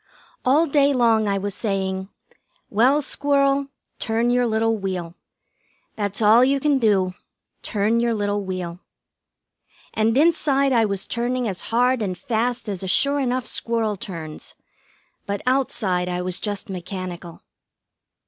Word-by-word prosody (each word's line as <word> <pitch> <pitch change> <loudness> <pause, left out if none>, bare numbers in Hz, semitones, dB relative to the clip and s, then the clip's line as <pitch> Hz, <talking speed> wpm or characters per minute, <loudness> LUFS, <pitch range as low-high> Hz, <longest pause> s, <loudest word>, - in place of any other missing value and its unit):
All 285 +6 +4
day 285 -2 +3
long 225 -4 +3
I 200 -1 +1
was 200 0 -3
saying: 190 -2 -2 0.6
"Well, 260 +8 +3
Squirrel, 280 0 +1 0.3
turn 230 +1 0
your 245 0 +2
little 225 0 +1
wheel. 185 -4 -4 0.8
That's 205 0 -2
all 220 +4 +6
you 275 +2 +2
can 285 -1 +2
do; 195 -5 +2 0.5
turn 215 +2 +1
your 235 -1 +1
little 205 -1 -1
wheel." 180 -2 -5 1.1
And 225 +2 +1
inside 280 -3 +3
I 230 -2 +4
was 200 -2 -2
turning 245 +1 -1
as 190 -3 -1
hard 245 +2 +2
and 185 -4 -2
fast 240 -1 -2
as 195 -3 -3
a 190 - -4
sure 280 +9 +2
enough 255 -2 -1
squirrel 225 -4 -1
turns; 170 -7 -7 0.7
but 200 0 -3
outside 210 -9 0
I 180 0 -2
was 180 -1 -3
just 205 +1 -3
mechanical. 185 -2 -7
220 Hz, 140 wpm, -22 LUFS, 195-255 Hz, 1.1 s, all